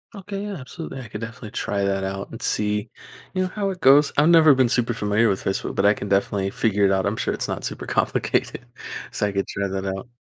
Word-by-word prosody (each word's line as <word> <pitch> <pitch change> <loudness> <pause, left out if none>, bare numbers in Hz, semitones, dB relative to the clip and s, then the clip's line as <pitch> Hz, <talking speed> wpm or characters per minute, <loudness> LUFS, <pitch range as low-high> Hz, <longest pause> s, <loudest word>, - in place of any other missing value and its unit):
Okay, 200 0 -6
yeah, 205 0 -4
absolutely, 140 -1 -7
I 120 - -10
could 105 - -6
definitely 115 -2 -8
try 100 -1 -2
that 95 -1 0
out 95 0 -4
and 115 - -9
see, 105 0 -1 0.4
you 185 - 0
know, 185 - -2
how 200 +1 -2
it 185 - -8
goes. 140 +2 +6
I've 150 +3 +5
never 160 -4 +7
been 130 -2 +3
super 120 -1 +1
familiar 105 +1 +2
with 95 -3 0
Facebook, 95 - -2
but 95 - +1
I 105 - +6
can 100 - -6
definitely 100 0 +1
figure 105 -1 +1
it 95 - +3
out. 95 -1 +1
I'm - - -1
sure - - -1
it's - - -3
not - - -3
super - - -5
complicated, - - 0 0.5
so 105 - 0
I 100 - -4
could 100 0 -1
try 100 0 -2
that 95 0 -3
out. 95 +3 -4
105 Hz, 245 wpm, -23 LUFS, 100-140 Hz, 0.5 s, never